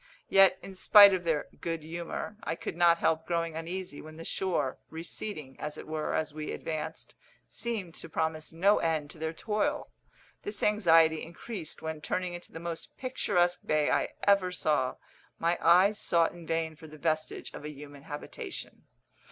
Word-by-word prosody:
Yet, 195 -1 +6
in 195 - -8
spite 200 +1 +8
of 180 -2 -1
their 160 -3 +1
good 165 -2 -3
humour, 170 +5 -5
I 160 - -2
could 165 - -5
not 170 -1 +5
help 160 -1 +1
growing 165 -2 -1
uneasy 170 0 -5
when 155 0 -11
the 165 - -8
shore, 165 -8 -1
receding, 160 -3 -6
as 150 0 -5
it - - -8
were, 155 -1 -2
as 155 -1 -1
we 155 0 -4
advanced, 160 0 -5 0.3
seemed 215 -8 -2
to 165 - -9
promise 160 0 -2
no 190 +6 +4
end 155 -3 0
to 160 - -12
their 160 0 -2
toil. 225 - -1 0.5
This 205 0 -4
anxiety 165 -6 +5
increased 170 -1 -7
when, 160 -1 -4
turning 180 +2 -2
into 175 0 -9
the 165 - -7
most 170 -1 -6
picturesque 180 -9 +1
bay 155 -1 +2
I - - +2
ever 200 -2 +4
saw, 150 -7 +1 0.4
my 170 +1 +2
eyes 190 +5 +5
sought 170 -2 +3
in 170 -2 -12
vain 165 -1 -1
for 160 +1 -12
the 155 0 -12
vestige 155 0 -2
of - - -8
a 150 - -5
human 145 -1 -10
habitation. 145 +1 -7
165 Hz, 175 wpm, -30 LUFS, 155-185 Hz, 0.5 s, spite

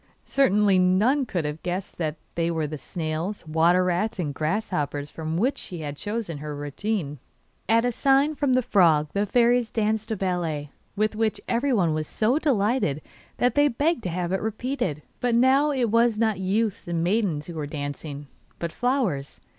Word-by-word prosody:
Certainly 210 -7 +3
none 215 +10 +3
could 175 -7 -2
have 150 +1 -4
guessed 180 +1 -4
that 155 -3 -1 0.2
they 170 0 0
were 160 -2 -1
the 150 0 -5
snails, 165 +6 -4
water 165 +3 +3
rats, 185 +5 0
and 155 -6 -2
grasshoppers 155 -3 -2
from 160 0 -4
which 250 +9 +1
she 175 -3 -7
had 145 -1 -5
chosen 205 -3 -4
her 150 0 -5
retinue. 145 +2 -3 0.5
At 230 +1 +4
a 245 - +2
sign 275 +5 +3
from 285 -3 +1
the 255 0 +3
frog 165 -10 +4
the 205 +1 0
fairies 240 +1 +3
danced 220 0 -1
a 220 - 0
ballet, 170 -7 -2 0.2
with 215 +1 0
which 220 -1 0
everyone 235 - +2
was 155 -1 -2
so 240 +7 +1
delighted 215 - +1 0.3
that 245 - +2
they 290 0 +4
begged 290 +3 0
to 185 - -3
have 175 0 -2
to 190 - +2
repeated; 220 - -2 0.2
but 245 -1 +1
now 265 +5 +4
it 255 -6 0
was 230 -1 +3
not 220 -3 +1
youths 200 +2 -1
and 170 -1 -1
maidens 180 -6 0
who 170 - -7
were 155 -3 -4
dancing, 145 0 -6 0.3
but 170 -1 -4
flowers. 240 - -1
195 Hz, 180 wpm, -25 LUFS, 160-230 Hz, 0.5 s, At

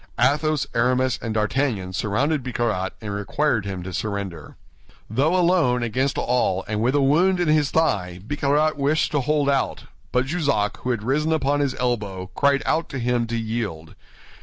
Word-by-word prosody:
Athos, 150 +2 +2
Aramis, 125 +2 +1
and 110 -1 -3
D'Artagnan 105 -4 0
surrounded 130 - 0
Bicarat, 115 -7 -2
and 105 -2 -5
required 105 +2 0
him 95 -2 -5
to 95 0 -7
surrender. 100 -5 -4 0.6
Though 145 +10 +2
alone 170 -9 +3
against 130 +4 0
all 105 -6 0
and 105 0 -2
with 125 +4 +2
a 145 - +3
wound 175 +7 +3
in 175 - +1
his 155 -2 +3
thigh, 90 - 0
Bicarat 145 +3 +1
wished 145 +2 +1
to 145 - +1
hold 145 +2 +1
out; 140 -1 0 0.3
but 125 +1 +2
Jussac, 140 - 0
who 125 - -5
had 120 -4 -1
risen 150 +6 +1
upon 145 -2 +1
his 140 -2 0
elbow, 100 -7 -2
cried 140 -1 +2
out 165 0 0
to 135 - -5
him 120 -1 0
to 115 +1 -2
yield. 110 -9 -4
125 Hz, 170 wpm, -23 LUFS, 105-145 Hz, 0.6 s, alone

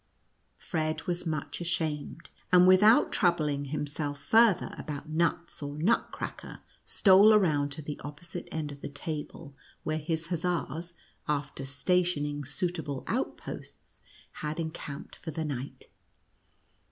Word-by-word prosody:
Fred 155 -1 -2
was 175 0 -3
much 155 +2 -3
ashamed, 160 -2 -3 0.2
and 180 0 +8
without 195 +5 +6
troub 175 -4 +3
ling 145 -2 -1
himself 145 0 -3
farther 220 +4 +4
about 150 0 -6
nuts 170 +1 0
or 145 0 -5
Nutcracker, 195 +10 -1 0.2
stole 200 +2 +6
around 150 -8 +3
to 155 - -6
the 150 0 -6
opposite 150 +4 -7
end 155 -2 -3
of 140 0 -10
the - - -5
table, 150 -1 -6 0.3
where 155 0 -1
his 160 +1 -3
hussars, 170 -1 -2 0.3
after 145 -2 -2
stationing 145 0 0
suitable 145 -1 -2
out - - -1
posts, - - -10 0.3
had 155 +2 -4
encamped 160 -3 -6
for 165 - -8
the 160 +1 -3
night. 140 -2 -5
155 Hz, 130 wpm, -29 LUFS, 145-175 Hz, 0.3 s, and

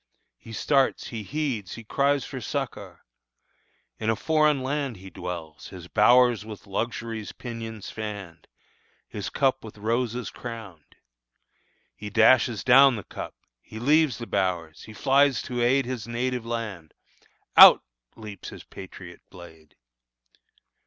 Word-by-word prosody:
He 115 - -13
starts, 135 +4 +1
he 115 -2 -5
heeds 125 -4 -3
Her 115 - -10
cries 140 +4 +1
for - - -7
succor. - - -5 0.9
In 110 - -1
a 115 - +2
foreign 155 -1 +2
land 135 -3 -2
He 95 0 -12
dwells; 85 -4 -7
his 90 -2 -11
bowers 120 +2 +4
with 105 -2 -10
luxury's 115 +1 -4
pinions 115 -3 -7
fanned, 100 -7 -7 0.6
His 105 - -5
cup 135 -2 0
with 110 -1 -11
roses 115 +3 -2
crowned. 110 -10 -10 1.0
He 105 - -7
dashes 110 +2 +4
down 135 +1 +7
The 105 - -6
cup, - - -8 0.3
he 110 - -11
leaves 145 0 +3
the 120 - -6
bowers; 90 -6 -2
he 110 - -11
flies 135 +2 +3
to 120 -1 -3
aid 130 +2 +3
His 125 -3 -5
native 120 0 -2
land. 105 -9 -5 0.6
Out - - +10 0.3
leaps 105 -2 -9
his - - -11
patriot - - -11
blade! 80 -3 -15
115 Hz, 130 wpm, -25 LUFS, 100-130 Hz, 1.0 s, Out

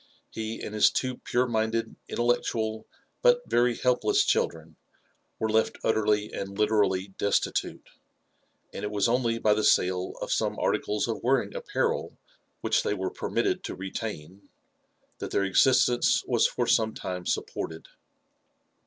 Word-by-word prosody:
He, 110 0 -5
and 105 - -6
liis 105 - +5
two 130 -1 -2
pure 125 +1 0
minded, 115 0 -1
intellectual, 110 -2 -1 0.3
but - - +4
yery 120 0 +2
helpless 125 -1 +2
children, 80 -1 -1 0.6
were 110 - -1
left 110 0 +1
utterly 105 -1 +1
and 100 0 -5
literally 105 -3 +2
destitute* 100 - -1 0.9
ai\4 - - -6
it 105 - -2
was 105 0 +1
only 115 -1 +1
by 110 -2 +3
the 105 +1 0
sale 90 -1 +2
of - - -4
some - - 0
articles 105 +2 0
of 115 - -3
wearing 120 -5 +1
apparel - - -2 0.4
which - - +2
they 105 - -1
were 95 -1 -3
permitted - - -1
to - - -5
retain, 95 -2 -7 0.7
that - - -5
their 100 - +1
existence 120 +4 +3
was - - +3
for - - -2
some 110 -1 +2
time 90 -1 -5
supported. 80 0 -3
110 Hz, 140 wpm, -27 LUFS, 100-115 Hz, 0.9 s, liis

